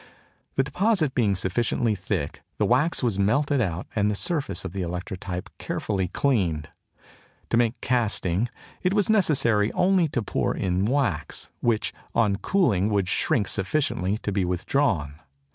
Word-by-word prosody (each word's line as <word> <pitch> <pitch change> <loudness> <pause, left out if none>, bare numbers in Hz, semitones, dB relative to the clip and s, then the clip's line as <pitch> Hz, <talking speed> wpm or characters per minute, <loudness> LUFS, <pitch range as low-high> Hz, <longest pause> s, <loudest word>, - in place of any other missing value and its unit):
The 135 - +3
deposit 180 - +1
being 110 -7 +2
sufficiently 110 +4 0
thick 95 -6 -3 0.2
the - - +2
wax 155 -2 +2
was 110 -5 0
melted 140 +7 +2
out 90 -4 -2
and 105 -1 +2
the 105 - 0
surface 145 - -2
of - - -4
the 100 - -3
electrotype 90 +1 -4
carefully 95 -3 -2
cleaned. 85 - 0 0.8
To 115 - +3
make 120 0 +1
castings 110 -4 +1 0.3
it 185 +2 +1
was 210 0 +3
necessary 130 - +3
only 185 -2 +3
to 125 -5 -2
pour - - -1
in 95 +1 0
wax, 120 - -1
which 115 -2 0 0.2
on 105 -4 +3
cooling 110 - +2
would 100 -3 +1
shrink 115 - +1
sufficiently 95 - 0
to 100 - -1
be 95 -1 +1
withdrawn. 90 - 0
105 Hz, 145 wpm, -25 LUFS, 95-135 Hz, 0.8 s, The